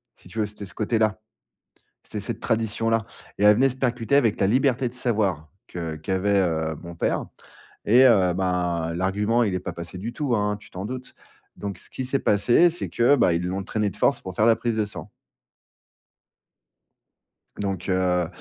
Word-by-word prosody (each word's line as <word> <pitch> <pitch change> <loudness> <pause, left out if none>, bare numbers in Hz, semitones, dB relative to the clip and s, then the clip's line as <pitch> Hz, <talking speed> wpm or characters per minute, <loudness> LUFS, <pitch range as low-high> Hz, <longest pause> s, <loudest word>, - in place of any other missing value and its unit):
Si - - -17
tu 110 - -7
veux, 110 - +2
c'était 105 -1 -8
ce 95 - -9
côté-là. 110 0 0 0.9
C'était - - -6
cette - - -4
tradition-là 115 0 0 0.3
et 105 - +1
elle 105 0 +8
venait 135 +2 +4
se 130 - -7
percuter 125 0 0
avec 115 -7 +3
ta 95 - +2
liberté 130 +2 +2
de 120 - -13
savoir, 105 - -1 0.2
que 80 -3 -5
qu'avait, 95 +5 0
heu, 80 -3 -1
mon 85 0 -8
père 85 - -1 0.6
et 120 +5 +6
heu, 95 -8 +5
ben 90 -3 -1
l'argument, 105 +6 +1
il 100 -4 0
est 90 - -1
pas - - -6
passé 85 +1 -7
du 110 +6 -5
tout, 140 -4 0
hein, 105 -1 0
tu 100 - -17
t'en 95 +2 -6
doutes. 125 +3 -7 0.4
Donc 100 -3 -5
ce - - -15
qui 130 - -5
s'est 135 +2 0
passé, 120 - +4
c'est 170 - -4
que, 120 +5 +4
ben, 100 - +4
ils 85 +1 -1
l'ont 95 +2 -3
traîné 105 +1 -1
de - - -12
force - - +2
pour 95 -1 -8
faire 105 - +3
la 115 -1 +6
prise 115 -1 -2
de 110 - +1
sang. 105 - -9 2.5
Donc 95 -2 -3
heu, 90 -2 +1
105 Hz, 190 wpm, -24 LUFS, 90-120 Hz, 2.5 s, elle